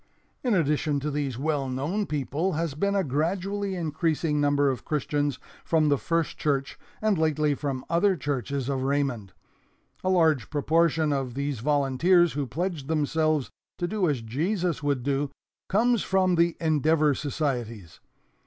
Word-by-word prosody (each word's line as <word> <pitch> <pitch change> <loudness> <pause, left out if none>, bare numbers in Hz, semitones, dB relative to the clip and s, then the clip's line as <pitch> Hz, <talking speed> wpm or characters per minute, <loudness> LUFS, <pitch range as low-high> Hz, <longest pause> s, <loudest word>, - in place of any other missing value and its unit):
"In 245 -5 +2
addition 150 -3 +1
to 150 +2 -2
these 140 -4 -2
well 145 -1 -1
known 155 +11 -2
people 150 +5 -1
has 160 -1 -1
been 200 +7 0
a 195 - +2
gradually 190 +7 -1
increasing 160 -2 0
number 145 0 +3
of 130 - -6
Christians 145 -2 -1 0.3
from 155 -2 +2
the 145 - +3
First 165 -1 -1
Church 140 -2 -1 0.2
and 210 -5 +2
lately 155 -2 +2
from 135 -2 -4
other 190 +3 +3
churches 140 - -3
of 135 -2 -1
Raymond. 135 -7 -1 0.7
A 185 - +1
large 160 - +3
proportion 160 0 +2
of 130 -3 -2
these 140 -2 -2
volunteers 150 +6 +3
who 145 -2 -2
pledged 165 0 -3
themselves 155 -1 0 0.3
to 175 - -1
do 195 -3 0
as 135 -5 -1
Jesus 170 - -1
would 140 -4 0
do 140 +1 0 0.4
comes 230 +2 +3
from 190 -1 +2
the 170 -1 +2
Endeavor 155 -1 +3
societies. 125 - -3
150 Hz, 150 wpm, -26 LUFS, 140-170 Hz, 0.7 s, number